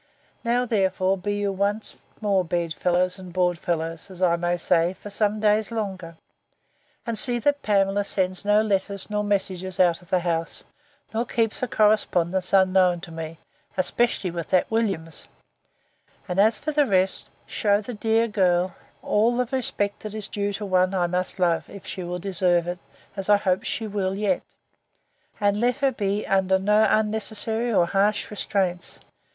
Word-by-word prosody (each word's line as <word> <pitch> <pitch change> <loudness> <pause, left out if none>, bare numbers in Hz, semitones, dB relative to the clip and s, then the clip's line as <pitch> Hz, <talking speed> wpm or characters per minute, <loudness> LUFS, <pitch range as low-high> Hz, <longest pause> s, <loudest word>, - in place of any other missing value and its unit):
—Now, 245 +1 +1
therefore, 190 -4 +1
be 205 +2 -3
you 205 -1 -1
once 200 +3 -1 0.3
more 200 -3 +2
bed 170 -1 -2
fellows 180 +3 0
and 185 -1 -10
board 180 -1 +1
fellows, 165 +1 -3
as 185 -2 -11
I 180 -2 +3
may 175 +1 -1
say, 170 +1 +2
for 205 +2 -11
some 210 +1 0
days 215 +1 +2
longer; 190 -7 -5 0.9
and 230 -2 -2
see 245 +2 +6
that 285 +4 +1
Pamela 200 -1 +2
sends 185 -1 0
no 210 +1 +3
letters 200 -1 -2
nor 210 0 0
messages 190 -2 -2
out 175 -2 +3
of 175 - -20
the 185 - +2
house, 165 -1 -2 0.5
nor 225 +2 0
keeps 230 -2 -1
a 255 - 0
correspondence 190 -5 +2
unknown 185 -2 +4
to 170 - -9
me, 160 0 -7 0.4
especially 195 -1 +1
with 170 -1 -5
that 185 +2 +2
Williams; 195 -8 -2 1.0
and, 180 +1 -2
as 220 +3 +4
for 310 - -3
the 295 -2 +2
rest, 190 -2 +1 0.2
shew 205 -1 +1
the 230 +4 -7
dear 225 +1 +1
girl 185 -4 +1 0.3
all 230 +3 +2
the 250 - +1
respect 205 -5 -1
that 215 0 -7
is 215 -2 -2
due 205 0 -2
to 205 +1 -4
one 185 0 +2
I 180 -2 +2
must 180 +2 -1
love, 175 -3 +1
if 200 - -11
she 185 - -5
will 175 +1 -4
deserve 180 -2 +1
it, 175 0 -4 0.4
as 195 0 -5
I 205 - +7
hope 190 -1 0
she 240 -6 -2
will 195 -2 -2
yet; 200 -2 0 1.0
and 205 0 +1
let 245 0 +2
her 275 -1 +2
be 205 -3 -2
under 190 -1 +2
no 210 +3 +3
unnecessary 220 +2 0
or 180 -5 +4
harsh 200 +5 +1
restraints. 190 -4 -2
195 Hz, 170 wpm, -24 LUFS, 180-215 Hz, 1.0 s, I